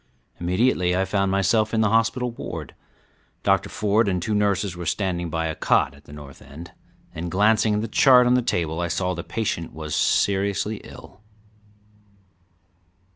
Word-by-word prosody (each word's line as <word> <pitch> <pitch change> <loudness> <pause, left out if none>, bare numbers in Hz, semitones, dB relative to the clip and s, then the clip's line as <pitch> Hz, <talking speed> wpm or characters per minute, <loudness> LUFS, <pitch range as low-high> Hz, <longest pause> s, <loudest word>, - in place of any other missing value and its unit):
Immediately 90 0 +1
I 95 - +1
found 100 0 0
myself 105 +3 +1
in 110 - +2
the 110 - +2
hospital 120 +2 +1
ward. 115 - -7 0.7
Dr. - - +1
Ford 105 +1 +1
and 90 -2 0
two 105 +5 -3
nurses 100 -2 0
were 85 -1 -6
standing 90 -1 -2
by 80 +1 -2
a 80 - -2
cot 65 - +1
at 70 0 -19
the - - -15
north 70 -2 -12
end, 80 +5 -11 0.4
and 85 +2 -5
glancing 105 +3 +2
at 105 - -1
the 115 - -3
chart 125 +2 +5
on 125 - +3
the 125 - +3
table 85 -7 -2
I 85 - -1
saw 90 +2 -1
the 85 -1 -6
patient 100 -6 -3
was 75 -1 -6
seriously 100 +2 +1
ill. 105 - -14
95 Hz, 170 wpm, -23 LUFS, 85-110 Hz, 0.7 s, chart